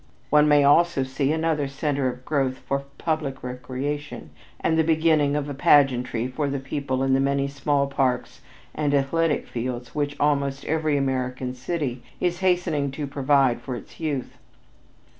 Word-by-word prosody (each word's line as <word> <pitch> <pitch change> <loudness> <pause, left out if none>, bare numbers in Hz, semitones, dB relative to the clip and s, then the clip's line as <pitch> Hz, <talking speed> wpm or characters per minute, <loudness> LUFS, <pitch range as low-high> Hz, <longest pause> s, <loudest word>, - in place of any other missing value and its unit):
One 150 0 +6
may 145 -1 +5
also 145 0 +4
see 135 +2 -1
another 160 -2 0
center 140 0 -1
of 125 0 -5
growth 135 -3 0
for 140 +1 -3
public 155 -5 -2
recreation 130 +4 -5 0.3
and 160 - +1
the 160 - +3
beginning 155 -2 +3
of 145 -1 -1
a 145 - -4
pageantry 125 -4 +3
for 140 +3 -2
the 140 - -2
people 135 0 -2
in 135 0 +2
the 135 - +4
many 140 0 +1
small 140 0 0
parks 135 -2 -1 0.3
and 145 -2 0
athletic 150 +3 +1
fields 125 0 -5
which 145 -1 -2
almost 140 -1 0
every 155 -2 +1
American 130 -2 -2
city 130 -1 -3 0.2
is 175 -1 0
hastening 175 -6 +1
to 145 +1 -3
provide 135 -2 +2
for 130 - -5
its - - -11
young. 145 -5 -2
140 Hz, 160 wpm, -24 LUFS, 130-150 Hz, 0.3 s, One